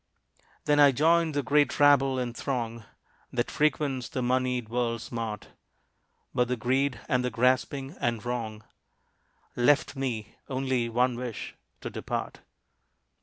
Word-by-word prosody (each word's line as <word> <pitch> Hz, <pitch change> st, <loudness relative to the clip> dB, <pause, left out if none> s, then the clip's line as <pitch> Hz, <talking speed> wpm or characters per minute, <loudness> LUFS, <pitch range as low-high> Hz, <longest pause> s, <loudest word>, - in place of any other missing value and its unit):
Then 145 Hz, 0 st, +3 dB
I 145 Hz, -1 st, +8 dB
joined 160 Hz, +3 st, +3 dB
the 145 Hz, -, +1 dB
great 145 Hz, +2 st, +2 dB
rabble 140 Hz, -2 st, +5 dB
and 125 Hz, -2 st, -3 dB
throng 115 Hz, -5 st, -3 dB, 0.5 s
That -, -, -1 dB
frequents 140 Hz, -5 st, 0 dB
the 130 Hz, -, -3 dB
moneyed 125 Hz, -1 st, 0 dB
world's 115 Hz, 0 st, -2 dB
mart; 115 Hz, -3 st, -4 dB, 0.8 s
But 125 Hz, -1 st, +2 dB
the 125 Hz, 0 st, -1 dB
greed, 130 Hz, +2 st, 0 dB
and 125 Hz, -4 st, +1 dB
the 125 Hz, -, 0 dB
grasping 130 Hz, +4 st, 0 dB
and 120 Hz, -2 st, -1 dB
wrong, 110 Hz, -3 st, -4 dB, 0.9 s
Left 145 Hz, +6 st, +3 dB
me 125 Hz, -6 st, -4 dB
only 130 Hz, -3 st, 0 dB
one 125 Hz, +1 st, +1 dB
wish 120 Hz, -3 st, -5 dB, 0.3 s
to -, -, -5 dB
depart. -, -, -4 dB
125 Hz, 130 wpm, -28 LUFS, 120-140 Hz, 0.9 s, I